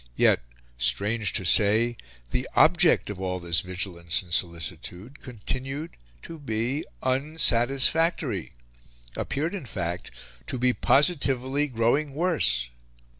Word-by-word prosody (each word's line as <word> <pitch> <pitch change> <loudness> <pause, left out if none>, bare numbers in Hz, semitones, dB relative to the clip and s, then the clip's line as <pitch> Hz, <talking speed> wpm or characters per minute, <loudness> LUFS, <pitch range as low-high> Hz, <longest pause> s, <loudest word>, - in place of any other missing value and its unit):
Yet, - - +4 0.4
strange 100 - +1
to 95 - -1
say, 110 +6 +4 0.4
the 125 - -2
object 170 - +4
of 95 -2 -8
all 90 -1 -2
this 85 -2 +1
vigilance 90 -2 -1
and 85 -2 -9
solicitude 90 - -3
continued 130 +6 -6 0.3
to 165 -1 -9
be 125 +2 -2 0.2
unsatisfactory 135 - +1 0.6
appeared, 155 +6 -3
in 185 -10 -6
fact, 85 -3 -4 0.4
to 130 - -3
be 125 +1 +2
positively 140 -2 +2
growing 135 +4 0
worse. 105 - +1
120 Hz, 110 wpm, -26 LUFS, 90-145 Hz, 0.6 s, Yet